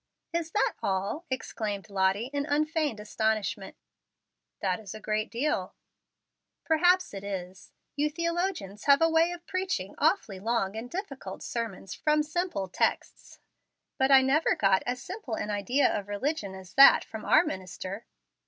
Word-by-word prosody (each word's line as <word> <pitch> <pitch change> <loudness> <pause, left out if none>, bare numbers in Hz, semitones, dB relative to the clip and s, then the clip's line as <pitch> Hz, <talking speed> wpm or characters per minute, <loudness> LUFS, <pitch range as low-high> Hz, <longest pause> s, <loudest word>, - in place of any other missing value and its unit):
"Is 335 -1 -1
that 425 - +2
all?" 200 - -2
exclaimed 215 -6 -4
Lottie, 195 +5 +1
in 285 0 -1
unfeigned 305 -4 0
astonishment. 215 0 -2 0.8
"That 185 0 0
is 215 -1 -9
a - - -7
great 215 0 -1
deal." 235 -7 -1 0.9
"Perhaps 355 - +3
it 195 0 -6
is. 190 -2 -6 0.2
You 295 +1 +1
theologians 335 - -2
have 280 -1 +6
a 330 0 +4
way 325 +2 +4
of 350 0 -8
preaching 375 0 -2
awfully 210 - +1
long 220 -1 -1
and 230 +2 -6
difficult 275 - -6
sermons 220 -5 -4
from 300 0 +2
simple 310 - -2
texts. 185 - -2 0.6
But 265 0 +3
I 270 -1 +7
never 280 +5 +3
got 195 -2 +3
as 250 0 -1
simple 360 - -6
an 210 - -3
idea 205 +8 +2
of 200 -1 -4
religion 205 -1 -2
as 190 -1 -12
that 275 0 +8
from 220 -1 -8
our - - +5
minister." 190 +3 -6
235 Hz, 150 wpm, -28 LUFS, 200-310 Hz, 0.9 s, that